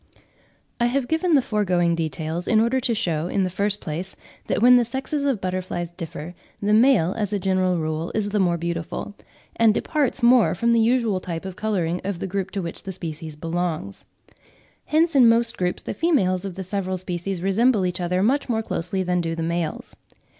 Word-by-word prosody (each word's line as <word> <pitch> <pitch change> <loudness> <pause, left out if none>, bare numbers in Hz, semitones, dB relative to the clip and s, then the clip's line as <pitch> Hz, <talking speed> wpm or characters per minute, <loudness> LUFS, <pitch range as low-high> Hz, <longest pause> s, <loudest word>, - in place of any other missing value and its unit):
I 240 - +3
have 255 +1 0
given 320 +3 +1
the 270 - +4
foregoing 180 -6 +1
details 160 +1 -3
in 220 - +4
order 235 +4 +2
to 245 -2 0
shew, 165 -5 -1
in 195 +1 0
the 185 - -1
first 200 +2 0
place, 175 +4 -5 0.3
that - - 0
when 250 +3 +7
the 245 - +5
sexes 265 +4 -3
of 270 -7 +1
butterflies 185 -2 -3
differ, 165 -1 -7 0.3
the 210 +1 +1
male 220 -7 +4
as 210 -2 -2
a - - +2
general 185 -1 +1
rule 155 +1 -2
is 210 -2 0
the 210 0 0
more 175 -3 +2
beautiful, 170 +3 -4 0.4
and 225 -2 +4
departs 280 -4 -1
more 240 -1 +5
from 235 0 +1
the 230 - +4
usual 225 -4 +2
type 170 -1 -6
of 190 -2 -6
colouring 180 -6 -1
of 195 -1 -3
the 180 - -4
group 190 0 -3
to 195 0 -4
which 170 - -6
the 195 - -6
species 160 -3 -7
belongs. 165 - -3 0.8
Hence 320 +2 +2
in 250 -4 +7
most 230 0 +2
groups 180 -1 -2
the - - -4
females 200 - +1
of 190 -3 -5
the 190 - -5
several 185 0 -2
species 180 0 -4
resemble 210 +1 +3
each 180 0 -2
other 180 +2 0
much 270 +5 +1
more 225 -2 0
closely 185 -1 -2
than 180 -1 0
do 165 -1 -2
the 165 - -3
males. 170 0 -3
190 Hz, 200 wpm, -23 LUFS, 175-230 Hz, 0.8 s, when